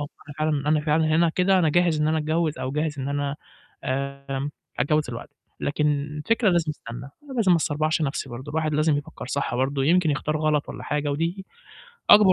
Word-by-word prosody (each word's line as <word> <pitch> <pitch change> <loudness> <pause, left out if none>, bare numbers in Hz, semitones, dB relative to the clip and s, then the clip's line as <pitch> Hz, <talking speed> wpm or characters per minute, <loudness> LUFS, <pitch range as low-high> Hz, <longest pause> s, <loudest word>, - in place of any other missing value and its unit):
أنا 145 0 -9
فعلًا 150 -2 0
أنا 155 0 +4
فعلًا 155 +1 +2
هِنا 170 0 +4
كده 185 +3 +3
أنا 165 - +3
جاهز 170 -1 +3
إن 150 - +2
أنا 160 - +2
أتجوّز 155 0 0
أو 130 - -2
جاهز 150 -1 -1
إن 135 +1 -3
أنا 145 0 -1 0.5
آمم 140 +1 -3 0.3
أتجوّز 150 +3 +2
دلوقتي. 130 +5 -8 0.3
لكن 150 +1 0 0.2
الفكرة 150 - 0
لازم 170 -2 +2
أستنى، 120 -5 -8
أنا 265 - -12
لازم 205 -6 +4
ما 170 - +6
أسربعش 155 +1 0
نَفْسي 140 -2 -2
برضه، 130 +5 -7
الواحد 155 -1 0
لازم 155 -1 +3
يفكّر 140 - -8
صح 140 -2 -2
برضه 135 +1 0
يمكن 170 0 +4
يختار 155 +1 -1
غلط 150 -1 +1
والّا - - -7
حاجة، 150 0 -1
ودي 170 +6 -2 0.6
أكبر 205 -3 +9
150 Hz, 195 wpm, -25 LUFS, 140-160 Hz, 0.6 s, أكبر